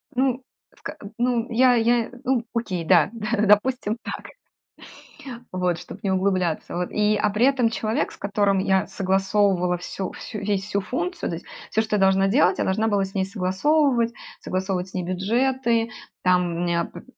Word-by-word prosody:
Ну, 255 Hz, 0 st, +1 dB, 0.3 s
в -, -, -25 dB
ка -, -, -6 dB
м, 200 Hz, -, -10 dB
ну, 240 Hz, -1 st, +1 dB
я 250 Hz, +2 st, +5 dB
я, 235 Hz, 0 st, +2 dB
ну, 255 Hz, -3 st, +1 dB
окей, 195 Hz, -7 st, -2 dB
да 170 Hz, -2 st, +5 dB
да, 215 Hz, -1 st, -1 dB
допустим, 215 Hz, +2 st, +2 dB
так. -, -, -6 dB, 1.2 s
Вот, 180 Hz, -2 st, 0 dB
чтоб -, -, -11 dB
не 195 Hz, -, 0 dB
углубляться. 185 Hz, -4 st, 0 dB
Вот 180 Hz, 0 st, -2 dB
и, 210 Hz, 0 st, +2 dB
а 210 Hz, 0 st, +1 dB
при 225 Hz, +6 st, +3 dB
этом 250 Hz, -5 st, +2 dB
человек, 225 Hz, +5 st, -1 dB
с -, -, -13 dB
которым 200 Hz, -1 st, +1 dB
я 190 Hz, 0 st, +2 dB
согласовывала 190 Hz, -2 st, +1 dB
всю 185 Hz, +1 st, -5 dB
всю 215 Hz, -, -8 dB
весь 200 Hz, -1 st, -1 dB
всю 200 Hz, 0 st, -1 dB
функцию, 335 Hz, -, -3 dB
то 165 Hz, -, -2 dB
есть, -, -, -13 dB, 0.3 s
всё, 220 Hz, -, +2 dB
что 220 Hz, -1 st, -1 dB
я -, -, +1 dB
должна 195 Hz, 0 st, +4 dB
делать, 195 Hz, -4 st, +3 dB
я -, -, +2 dB
должна 215 Hz, +4 st, +1 dB
была 205 Hz, -2 st, +2 dB
с 195 Hz, +1 st, -7 dB
ней 190 Hz, -1 st, +1 dB
согласовывать, 235 Hz, +6 st, +1 dB, 0.3 s
согласовывать 185 Hz, 0 st, -2 dB
с -, -, -19 dB
ней 185 Hz, -, -2 dB
бюджеты, 230 Hz, +5 st, 0 dB, 0.3 s
там 180 Hz, -1 st, +3 dB
у 170 Hz, -, -4 dB
меня 170 Hz, -1 st, 0 dB
пот -, -, -11 dB
205 Hz, 185 wpm, -23 LUFS, 190-235 Hz, 1.2 s, я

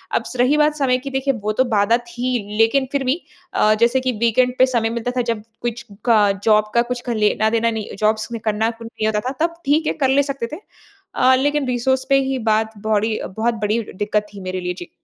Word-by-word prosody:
अब -, -, +1 dB
स -, -, -7 dB
रही 255 Hz, +5 st, +4 dB
बात 300 Hz, 0 st, +3 dB
समय 265 Hz, -4 st, +2 dB
की, 275 Hz, +2 st, -7 dB
देखिए 270 Hz, +1 st, 0 dB
वो 215 Hz, -, 0 dB
तो 260 Hz, -, +3 dB
बाधा 215 Hz, +2 st, +3 dB
थी, 240 Hz, -3 st, -4 dB
लेकिन 260 Hz, +4 st, +3 dB
फिर 280 Hz, -1 st, 0 dB
भी 280 Hz, +8 st, 0 dB, 0.3 s
अ, 215 Hz, 0 st, +4 dB
जैसे 240 Hz, +3 st, +4 dB
कि 255 Hz, 0 st, 0 dB
वीकेंड 250 Hz, +2 st, +3 dB
पे 260 Hz, -, +7 dB
समय 235 Hz, -4 st, 0 dB
मिलता 235 Hz, +1 st, -3 dB
था, -, -, +3 dB
जब 230 Hz, -3 st, -2 dB, 0.2 s
कुछ 235 Hz, 0 st, -4 dB, 0.2 s
क 205 Hz, -3 st, +4 dB
जॉब 215 Hz, -1 st, +3 dB
का 235 Hz, -, +5 dB
कुछ 245 Hz, -, -2 dB
ख -, -, -2 dB
लेना 215 Hz, +1 st, +2 dB
देना 230 Hz, 0 st, +1 dB
नहीं 220 Hz, -2 st, -5 dB
जॉब्स 215 Hz, 0 st, +1 dB, 0.2 s
करना 220 Hz, +1 st, +1 dB
नहीं 225 Hz, -1 st, -3 dB
होता 215 Hz, -1 st, +1 dB
था, -, -, -4 dB
तब 335 Hz, 0 st, -4 dB
ठीक 305 Hz, +3 st, +2 dB
है -, -, +1 dB
कर -, -, +2 dB
ले 280 Hz, +2 st, +4 dB
सकते 275 Hz, -4 st, -4 dB
थे। 385 Hz, -, -12 dB, 0.5 s
अ, 255 Hz, +1 st, +4 dB
लेकिन 290 Hz, +1 st, 0 dB
रिसोर्स 260 Hz, +2 st, 0 dB
पे 275 Hz, 0 st, +5 dB
ही 265 Hz, -, -1 dB
बात 220 Hz, 0 st, 0 dB
बोड़ी 215 Hz, +1 st, +1 dB, 0.2 s
बहुत 235 Hz, +2 st, +1 dB
बड़ी 220 Hz, +3 st, +1 dB
दिक्कत 210 Hz, +2 st, -1 dB
थी 200 Hz, -, -9 dB
मेरे 185 Hz, 0 st, -4 dB
लिए, 180 Hz, 0 st, -2 dB
जी। 175 Hz, -1 st, -10 dB
235 Hz, 230 wpm, -20 LUFS, 215-260 Hz, 0.5 s, पे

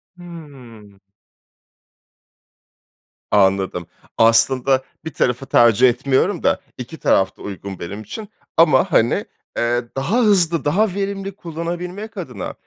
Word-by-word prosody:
Hımm. 135 Hz, -, -13 dB, 2.3 s
Anladım. 95 Hz, -3 st, +2 dB, 0.3 s
Aslında, 130 Hz, +3 st, +3 dB, 0.2 s
1 160 Hz, -, -6 dB
tarafı 125 Hz, +2 st, 0 dB
tercih 120 Hz, 0 st, +5 dB
etmiyorum 135 Hz, +9 st, 0 dB
da -, -, +1 dB, 0.2 s
2 125 Hz, +6 st, -8 dB
taraf 95 Hz, -9 st, +1 dB
da -, -, -17 dB
uygun 100 Hz, -1 st, -7 dB
benim 100 Hz, +5 st, -6 dB
için. 210 Hz, -, -8 dB, 0.3 s
Ama, 165 Hz, +2 st, +4 dB
hani, 115 Hz, -6 st, +2 dB, 0.3 s
eee, 120 Hz, +1 st, 0 dB
daha 165 Hz, -, 0 dB
hızlı, 180 Hz, -7 st, +2 dB
daha 190 Hz, +6 st, +2 dB
verimli 195 Hz, -1 st, -4 dB
kullanabilmek 175 Hz, +5 st, -6 dB
adına -, -, -6 dB
135 Hz, 110 wpm, -20 LUFS, 115-175 Hz, 2.3 s, tercih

